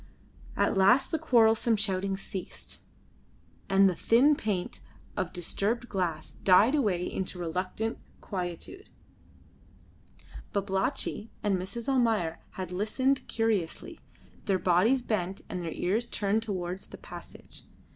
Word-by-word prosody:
At - - +2
last 230 +8 +4
the 320 - 0
quarrelsome 230 -5 +4
shouting 195 -2 0
ceased, 195 -1 -7 0.9
and 195 0 +6
the 185 - +2
thin 255 - +4
plaint 200 -8 -2 0.4
of 180 - -2
disturbed 210 +7 -1
glass 175 -5 -2
died 200 +7 +6
away 205 -12 +1
into 185 -1 -3
reluctant 185 +6 -3 0.2
quietude. 185 - -6 1.6
Babalatchi 200 +3 -1
and 205 -2 +2
Mrs. 190 +6 -5
Almayer 225 -11 +1
had 185 -2 -5
listened 255 +8 0
curiously, 220 -7 -1 0.5
their 195 -2 +2
bodies 200 +9 +3
bent 195 -4 -2
and 180 - -4
their 165 -2 -4
ears 210 +9 0
turned 205 +1 0
towards 185 -4 -4
the - - -10
passage. - - -11
195 Hz, 115 wpm, -29 LUFS, 185-230 Hz, 1.6 s, and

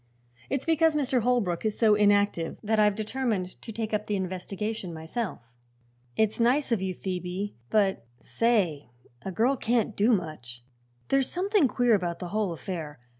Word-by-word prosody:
"It's 275 -1 -2
because 325 -1 +3
Mr. 265 -4 +1
Holbrook 220 -8 +1
is 215 -1 -1
so 220 -2 +5
inactive 205 -5 +2
that 220 +1 +1
I've 210 -1 +4
determined 215 -4 -2
to 225 - -7
take 220 0 -4
up 210 0 -1
the 210 - 0
investigation 190 +1 -4
myself." 160 - -4 0.8
"It's 220 +1 +1
nice 250 +4 +2
of 225 -5 +2
you, 190 -1 -2
Phoebe; 185 +2 -4 0.2
but, 200 - +2 0.2
say 190 - 0 0.3
a 190 - -5
girl 235 +8 +2
can't 230 -3 0
do 215 +5 +3
much. 155 - -3 0.5
There's 270 -1 +2
something 385 -3 +2
queer 245 -1 +2
about 175 -4 0
the 175 0 -6
whole 210 -2 0
affair. 160 -4 -6
210 Hz, 160 wpm, -27 LUFS, 180-235 Hz, 0.8 s, so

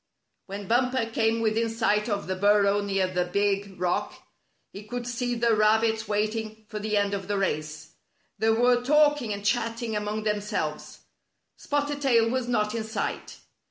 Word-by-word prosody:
When 200 0 -7
Bumper 250 +1 +2
came 225 0 0
within 225 +1 +1
sight 225 -1 +1
of 205 -1 -2
the 185 - -2
bur 205 +2 +4
row 200 +1 +2
near 195 -2 0
the 180 -1 -1
big 200 +1 -1
rock, 180 -1 -1 0.6
he 200 - -8
could 240 +3 -6
see 245 0 -2
the 230 -1 +2
rabbits 220 +1 +2
waiting 215 +1 -2
for 215 - -5
the 210 0 -1
end 200 0 +1
of 195 -2 -4
the 205 0 -1
race. 155 -5 -3 0.5
They 220 - +2
were 245 +2 +3
talk 295 +2 +4
ing 225 -4 -4
and 200 0 -5
chatting 230 0 -1
among 210 +1 -2
themselves. 210 0 -3 0.5
Spotted 290 0 -2
Tail 235 -5 +4
was 255 -1 -1
not 210 -3 0
in 230 -1 -2
sight. 220 +1 -4
215 Hz, 170 wpm, -26 LUFS, 205-235 Hz, 0.6 s, bur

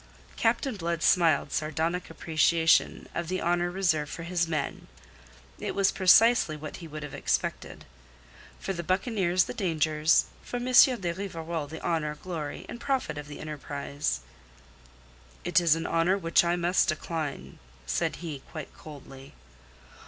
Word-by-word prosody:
Captain 270 -5 +1
Blood 170 -3 -2
smiled 160 -5 +3
sardonic 160 +3 -1
appreciation 165 +1 +2
of 170 - -3
the 185 +2 -2
honour 175 +1 +1
reserved 170 -5 0
for 165 - -6
his 170 0 0
men. 155 -4 -3 0.7
It - - -4
was 195 -1 +3
precisely 190 -3 +5
what 150 0 -7
he 170 - -9
would 155 -1 -7
have 150 - -7
expected. - - -2 0.7
For 195 - -3
the 170 - -4
buccaneers 185 0 +1
the - - -6
dangers; 155 -4 +2 0.2
for 245 - -5
M. 245 - -4
de 245 -8 +5
Rivarol 165 -4 -4
the 160 +3 -9
honour, 150 -3 -1
glory 155 -2 -6
and 235 - -8
profit 265 - -1
of 150 - -8
the 145 - -9
enterprise. 145 - -4 1.2
"It 175 0 +3
is 165 -2 +4
an 165 - -4
honour 170 +4 +2
which 165 -3 +3
I 170 0 +1
must 175 +2 +2
decline," 155 -2 -4 0.3
said 65 -1 -1
he 150 -4 -5
quite 155 -3 -8
coldly. 135 -2 -12
165 Hz, 145 wpm, -28 LUFS, 155-180 Hz, 1.2 s, precisely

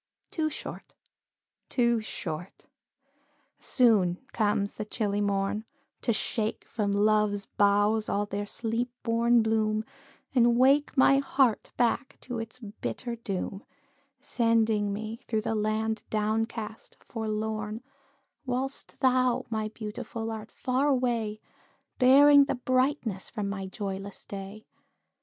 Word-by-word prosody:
Too 315 -2 0
short - - -8 0.7
too 235 -2 +2
short 175 -4 -6 0.9
soon 210 -9 +3 0.2
comes 205 -2 +1
the 215 - -4
chilly 205 -1 -1
morn, 200 +1 0 0.4
To - - +1
shake 220 0 -1
from 210 -3 -2
love's 205 0 +2
boughs 205 +2 +2
all 205 +1 +1
their 205 0 -4
sleep 230 +3 -1
born 230 0 +3
bloom, 215 -1 +1 0.5
And 240 -2 +4
wake 275 +3 +4
my 275 +1 +6
heart 270 -4 +2
back 245 +3 0
to 245 -2 -5
its 225 +1 -6
bitter 235 +1 -5
doom, 195 -2 -4 0.6
Sending 225 -5 +2
me 215 +2 -4
through 220 -2 0
the 220 - -2
land 220 +1 0
down 215 +1 +1
cast, 220 -2 -8
forlorn, 215 0 -3 0.6
Whilst 260 +1 -3
thou, 255 -1 +3
my 220 -1 -1
Beautiful, 225 +2 -5
art 220 -1 -6
far 260 +2 0
away, 240 -6 0 0.6
Bearing 280 +2 +8
the - - -1
brightness 255 -5 0
from 210 -3 -3
my 195 -1 -4
joyless 195 0 -5
day. 200 +2 -8
220 Hz, 120 wpm, -28 LUFS, 210-245 Hz, 0.9 s, Bearing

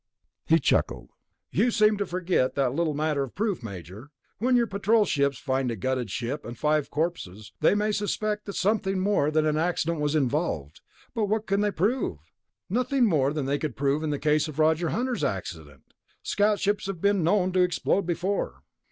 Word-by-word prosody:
He - - +5
chuckled. - - 0 0.4
"You 245 - +2
seem 215 -2 +4
to 200 - -2
forget 175 -7 0
that 135 -3 +1
little 160 0 0
matter 150 -1 0
of 135 -3 -5
proof, 205 - -1
Major. 100 - -9 0.3
When 250 +4 +2
your 240 -1 +4
Patrol 210 +1 +2
ships 140 -5 +1
find 130 -2 -1
a 115 - -2
gutted 125 +2 -2
ship 125 +8 -3
and 120 0 -8
five 150 +1 +1
corpses, 110 - -4
they - - +4
may 210 +1 +1
suspect 210 0 -2
that 200 - -5
something 200 -1 +1
more 185 -6 +2
than 155 0 +2
an 155 0 +1
accident 165 -1 0
was 150 +1 0
involved, 135 - -1 0.3
but 220 - 0
what 215 +1 -1
can 200 0 +1
they 210 - +2
prove? 205 - 0 0.5
Nothing 250 +4 +1
more 145 -9 +2
than 150 -2 -2
they 140 +1 0
could 150 -7 -3
prove 140 +3 0
in 155 - -2
the 145 - -1
case 150 +2 +1
of 155 -2 -8
Roger 160 +1 +2
Hunter's 245 -5 -1
accident. 85 - -4 0.4
Scout 205 0 +1
ships 205 0 0
have 195 -3 -4
been 200 -1 +2
known 185 +2 +2
to 185 0 +2
explode 180 +1 +1
before." 180 +3 -2
160 Hz, 190 wpm, -26 LUFS, 140-205 Hz, 0.5 s, He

